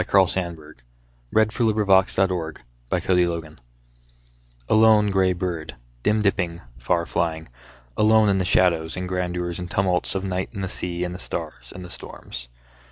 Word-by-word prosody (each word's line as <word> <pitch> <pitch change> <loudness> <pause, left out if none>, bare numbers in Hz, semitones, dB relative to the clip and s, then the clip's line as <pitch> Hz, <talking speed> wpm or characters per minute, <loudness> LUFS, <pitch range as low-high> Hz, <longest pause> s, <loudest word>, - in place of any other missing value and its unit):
Carl 95 -1 +5
Sandburg 85 -5 -4 0.6
OTHER 110 - +6
DAYS 105 - -10
FROM 115 0 +1
THE 95 -2 +4 0.7
SHORE 85 -4 0 1.1
A - - +1
LONE 110 -1 +5
gray 95 -1 +3
bird, 85 -5 -4 0.3
Dim 105 - +2
dipping, 90 -4 0 0.2
far 85 +8 0
flying, 80 -3 -2 0.5
Alone 110 0 +5
in 100 -1 +3
the - - +1
shadows 85 -2 +2
and 90 0 -3
grandeurs 90 -1 -2
and 90 0 -6
tumults 95 -2 0
Of 95 - -1
night 95 -1 -2
and 100 - -4
the 95 - -2
sea 90 -1 -3
And 90 0 -3
the 90 - -7
stars - - -6
and 90 -1 -9
storms. - - -9
90 Hz, 155 wpm, -23 LUFS, 85-95 Hz, 1.1 s, OTHER